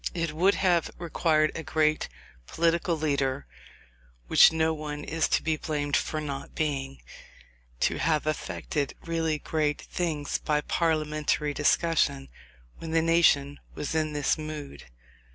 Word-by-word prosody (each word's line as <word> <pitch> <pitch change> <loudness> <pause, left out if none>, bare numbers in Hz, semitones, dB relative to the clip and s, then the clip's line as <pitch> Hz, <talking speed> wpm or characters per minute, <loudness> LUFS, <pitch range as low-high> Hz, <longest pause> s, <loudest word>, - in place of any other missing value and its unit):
It 165 -2 -1
would 185 +6 +3
have 175 -3 +2
required 160 -2 +1
a - - -5
great 155 0 +1 0.4
political 170 +1 +1
leader, 140 -3 -1 0.8
which - - +7
no 160 0 +1
one 150 -1 -5
is 160 +1 0
to - - +1
be 155 -1 0
blamed 145 -2 -2
for 155 - -1
not 140 -3 -6
being, 135 -3 -3 0.8
to - - +1
have 155 -2 +1
effected 140 - -3
really 165 -2 0
great 150 -1 -1
things 155 -5 -3
by 150 -1 0
parliamentary 155 -2 0
discussion 140 -4 +1 0.5
when 165 - -7
the 165 0 +2
nation 150 -4 +3 0.2
was 145 - -4
in 155 -1 0
this 145 +2 0
mood. 155 -2 -7
155 Hz, 135 wpm, -27 LUFS, 145-165 Hz, 0.8 s, which